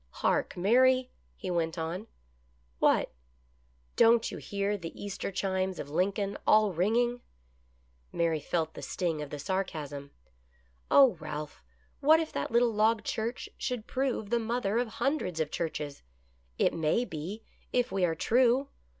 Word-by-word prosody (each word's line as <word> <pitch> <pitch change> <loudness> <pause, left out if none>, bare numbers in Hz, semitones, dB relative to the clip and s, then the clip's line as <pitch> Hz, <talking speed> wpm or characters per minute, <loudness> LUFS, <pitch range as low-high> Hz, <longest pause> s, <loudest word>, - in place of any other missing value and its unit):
" - - -38
Hark, - - +1
Mary! 255 +6 +4
" - - -37
he 185 - -4
went 165 -1 -1
on. 170 +6 -4 0.4
" - - -38 0.3
What? - - +3 0.3
" - - -38
" 60 0 -37
Don't 230 0 +5
you - - -6
hear 200 0 -1
the 170 -5 -8
Easter 200 -1 -4
chimes 190 -1 -1
of 145 - -6
Lincoln, 195 +4 0
all 215 -2 +5
ringing? 240 +7 +1 0.5
" 60 0 -37
Mary 165 -2 +1
felt 160 +1 -2
the - - -8
sting 165 -4 -2
of 150 - -6
the 145 - -5
sarcasm. 145 -5 -3 0.4
" 60 - -35 0.3
Oh, 265 -9 +6
Ralph, 150 -1 -6 0.4
what 315 +3 +6
if 320 -1 -3
that - - -2
little 235 0 +3
log 215 +1 +2
church 225 +3 -3
should 250 -4 -3
prove 255 -6 -2
the 235 - +3
mother 230 -1 0
of 245 - 0
hun 275 +7 0
dreds 175 -3 -4
of 155 -1 -1
churches 150 -4 -4 0.3
— 60 0 -37
it - - +2
may 165 +9 +1
be, 180 +5 -6 0.3
if 245 -4 +1
we 190 -1 0
are 165 -2 +2
true 250 - +3
190 Hz, 175 wpm, -30 LUFS, 160-235 Hz, 0.5 s, Oh